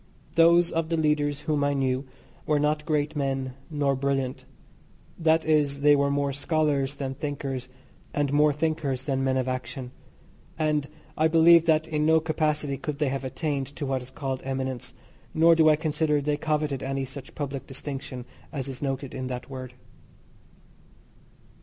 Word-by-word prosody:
Those 170 +1 +5
of 165 -1 -1
the 165 - +1
leaders 150 -2 +1
whom 150 -2 0
I 145 0 +1
knew 130 0 0 0.4
were 150 - +3
not 150 +1 0
great 150 -1 0
men, 135 -2 -1 0.2
nor 145 -3 +1
brilliant 135 -1 -1 0.7
that 160 -1 +3
is 145 -3 +2
they 145 0 +6
were 140 0 +2
more 140 0 0
scholars 145 -1 0
than 135 -1 -3
thinkers, 135 -2 -4 0.4
and 145 -1 0
more 150 +1 +5
thinkers 150 -3 -1
than 135 -1 -1
men 130 0 +1
of 130 -1 0
action; 130 0 -4 0.7
and 150 -2 0 0.3
I 155 - +3
believe 165 +1 +6
that 160 0 +3
in 150 -1 0
no 160 +1 +5
capacity 150 -3 -1
could 150 -3 -4
they 150 -2 +1
have 135 +1 -3
attained 135 0 -2
to 145 - -4
what 135 -1 -1
is 125 - -10
called 130 -1 -4
eminence, 130 -2 -4 0.4
nor 165 +1 +6
do 160 -1 +5
I 155 - +6
consider 150 -1 +1
they 145 +1 0
coveted 150 -2 -1
any 135 0 -2
such 135 0 -9
public 140 -2 -4
distinction 135 -2 -6 0.3
as 140 -4 -4
is 135 -2 -7
noted 135 -1 -3
in 130 -1 -4
that 125 +1 -6
word. 130 -1 -7
145 Hz, 165 wpm, -26 LUFS, 135-155 Hz, 0.7 s, they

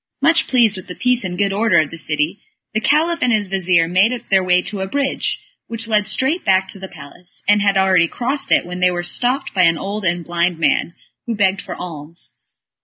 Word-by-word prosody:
Much 325 +4 +2
pleased 235 -6 +3
with 185 - -10
the 180 - -8
peace 250 -2 +1
and 180 -1 -5
good 200 0 0
order 205 -3 +2
of 155 -3 +2
the 165 - -8
city, 150 +4 -2 0.3
the 215 - +1
Caliph 325 +6 +1
and 250 - +2
his 210 -3 0
vizir 180 -3 +2
made 215 +7 +1
their 190 -1 +4
way 180 0 +3
to 190 +2 -5
a 190 - -3
bridge, 280 +5 -2 0.2
which 230 0 -3
led 210 -3 +1
straight 265 +10 0
back 190 0 +2
to 195 - -11
the 190 - -7
palace, 170 +1 -12
and 205 0 +4
had 200 -1 +2
already 190 -3 +3
crossed 265 - -2
it, - - +3
when 180 +1 -7
they 180 0 +4
were 175 -1 -3
stopped 250 +9 +1
by 185 - +2
an 165 -2 +4
old 200 +5 -5
and 175 -1 -1
blind 170 0 -1
man, 170 +1 0 0.3
who 230 - -2
begged 195 -2 +1
for - - -8
alms. 165 -1 -8
190 Hz, 225 wpm, -18 LUFS, 175-230 Hz, 0.3 s, their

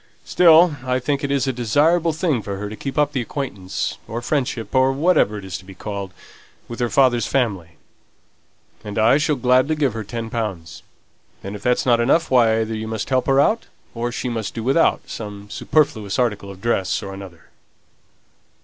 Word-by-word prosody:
Still, 165 -2 +5
I 125 -1 0
think 140 +2 -2
it's 140 -1 0
a 130 - -1
desirable 150 +9 +2
thing 155 -6 0
for 100 -1 -5
her 105 +1 -5
to 110 - -7
keep 135 +6 -6
up 150 -1 +2
the 135 -3 -1
acquaintance, 105 -8 -4
or 115 +2 -4
friendship, 125 -7 -2
or 130 0 +4
whatever 140 - +2
it 100 - -8
is 95 -3 -5
to - - -15
be 95 0 -13
called, 100 -1 -6 0.6
with 120 - -8
her 120 -1 0
father's 120 -1 +3
family; 95 -11 -1 1.1
and 105 0 -7
I 115 +6 +4
shall 150 0 +1
gladly 130 +4 +2
give 140 -6 0
her 110 0 -4
ten 115 +2 -6
pounds; 90 -8 -4 0.6
and 100 +1 -6
if 105 - -9
that's 125 +3 +1
not 120 -2 +4
enough, 150 +7 +2
why, 115 -3 +4
either 110 0 -3
you 110 0 -4
must 110 +3 -4
help 130 -1 +1
her 135 0 +4
out, 220 +10 +2 0.3
or 120 +1 -3
she 125 - -4
must 115 -4 -4
do 115 - -4
without 135 +7 +2
some 105 -2 -8
superfluous 110 -5 0
article 105 -5 -1
of 95 -1 -11
dress 110 -3 0
or 95 -1 -6
another." 95 -4 -12
120 Hz, 190 wpm, -21 LUFS, 105-135 Hz, 1.1 s, Still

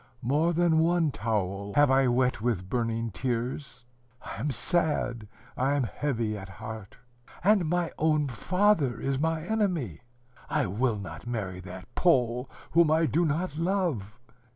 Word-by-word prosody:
More 150 +7 +2
than 170 -1 +3
one 165 -1 +3
towel 100 -4 -2
have 145 -2 +5
I 135 0 +4
wet 125 -1 +1
with 110 -6 -1
burning 115 0 -1
tears. 125 +2 -3 0.4
I - - -6
am 140 +7 -1
sad, 135 - 0 0.3
I 135 +3 +1
am 140 - +1
heavy 115 -4 -2
at 95 -1 -8
heart. 110 0 -8 0.5
And 195 -4 +4
my 175 -1 0
own 155 -2 +2
father 150 - +1
is 135 -1 -1
my 160 +1 0
enemy. 175 - -1 0.5
I - - +1
will 110 +4 0
not 100 +4 -8
marry 100 -6 -3
that 90 -1 -10
Pole, 125 -6 +2 0.2
whom 165 -1 +5
I 160 +1 +4
do 170 +2 +2
not 155 +1 -1
love. 165 - -1
130 Hz, 150 wpm, -28 LUFS, 110-160 Hz, 0.5 s, have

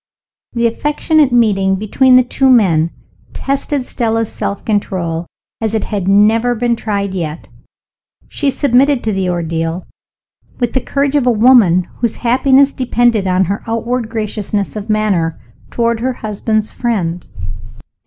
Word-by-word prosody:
The 235 -1 0
affectionate 295 +4 +1
meeting 200 -5 +2
between 250 +6 +3
the 255 - +6
two 265 +2 +1
men 175 -10 +4 0.4
tested 275 0 -2
Stella's 225 -3 -1
self 200 - -4
control 175 -6 -2 0.3
as 220 0 -1
it 220 - -1
had 200 -4 -3
never 220 +5 +3
been 235 +1 0
tried 200 -3 -3
yet. 165 -4 -5 0.8
She 285 - -1
submitted 270 0 +2
to 220 - -1
the 190 -1 -1
ordeal 165 0 -3 0.7
with 240 -2 -1
the 260 - 0
courage 280 +2 -1
of 275 -4 +2
a - - +5
woman 215 -6 +5
whose 235 -2 -1
happiness 270 +3 +4
depended 240 -5 +1
on 185 +1 +2
her 200 +3 -2
outward 230 +1 -2
graciousness 210 -2 -3
of 210 +1 -6
manner 195 - 0 0.3
toward 235 -1 0
her 255 +2 -1
husband's 215 -1 -2
friend. 180 -8 -2
225 Hz, 140 wpm, -15 LUFS, 195-245 Hz, 0.8 s, the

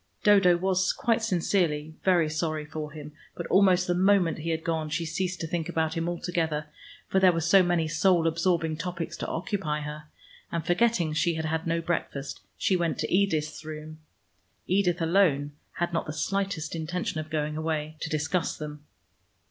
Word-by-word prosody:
Dodo 195 -4 +6
was 185 +1 +1
quite 235 -3 +1
sincerely 170 -6 0
very 175 -4 +4
sorry 155 0 -2
for 150 0 -6
him, 150 0 -9 0.2
but - - -5
almost 185 -2 +5
the 180 - +1
moment 185 -2 +3
he 165 +2 -4
had 160 0 -1
gone 160 -2 -1
she 165 +2 -2
ceased 180 +2 -2
to - - -2
think 165 0 -3
about 160 -1 0
him 165 +1 -1
altogether, 165 -3 -2 0.4
for 190 - +2
there 185 -1 +6
were 165 - -1
so 170 +4 +5
many 175 -3 +1
soul 165 +1 +3
absorbing 165 -1 +1
topics 170 -1 -4
to - - -4
occupy 165 -4 -2
her, 150 +1 -6 0.5
and 170 -1 -2
forgetting 175 -4 +2
she 170 +2 +1
had 160 0 -3
had 160 +1 -2
no 165 0 +1
breakfast, 145 -5 -3 0.2
she 190 - +2
went 170 -2 0
to - - -2
Edith's 160 -6 +1
room 155 0 -8 0.7
(Edith 180 -3 +1
alone 165 -5 +3 0.2
had 175 -1 -2
not 165 - -1
the 155 - -4
slightest 190 +1 -2
intention 165 0 -3
of 155 0 -6
going 150 -1 -2
away) 155 -1 -2
to - - -4
discuss 160 +3 -1
them. 150 -1 -7
165 Hz, 180 wpm, -27 LUFS, 155-180 Hz, 0.7 s, Dodo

